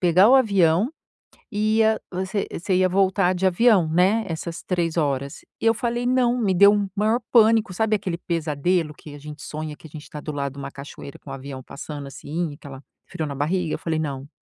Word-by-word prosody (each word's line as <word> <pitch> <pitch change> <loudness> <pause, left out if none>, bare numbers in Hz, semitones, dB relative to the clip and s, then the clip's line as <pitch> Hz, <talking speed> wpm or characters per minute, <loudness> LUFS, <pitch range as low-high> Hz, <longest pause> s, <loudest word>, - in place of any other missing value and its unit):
pegar 180 +3 +5
o - - +7
avião, 200 - +3 0.7
ia 220 +1 +2
você 190 +2 -2
você 185 +3 -2
ia 185 0 +3
voltar 190 0 +2
de 185 +1 0
avião, 190 -2 +4
né, 185 +7 +3
essas 165 +1 -5
3 170 -3 -1
horas 140 -3 -1 0.2
e - - -2
eu 225 - +5
falei: 240 +1 -2
"Não", 250 -1 +2
me 200 -4 +2
deu 200 +3 +7
o 200 -2 -1
maior 215 +4 +2
pânico, 225 -3 +5
sabe, 220 +3 +1
aquele 185 -4 -4
pesadelo 165 0 -1
que 150 -1 -12
a - - -9
gente 150 0 -10
sonha 155 +1 -6
que - - -14
a - - -14
gente 150 0 -10
tá 150 - -7
do 150 - -5
lado 140 -2 -3
de - - -12
uma 140 - -6
cachoeira 140 0 -10
com 140 - -13
o - - -4
avião 135 -1 -8
passando, 145 +1 -8
assim, 150 +4 -4
aquela 140 -2 -11 0.2
frio 170 -3 -4
na 140 - -5
barriga? 160 +4 -1
Eu - - -4
falei: 160 -1 -2
"Não, 140 -2 -4
175 Hz, 210 wpm, -23 LUFS, 150-205 Hz, 0.7 s, o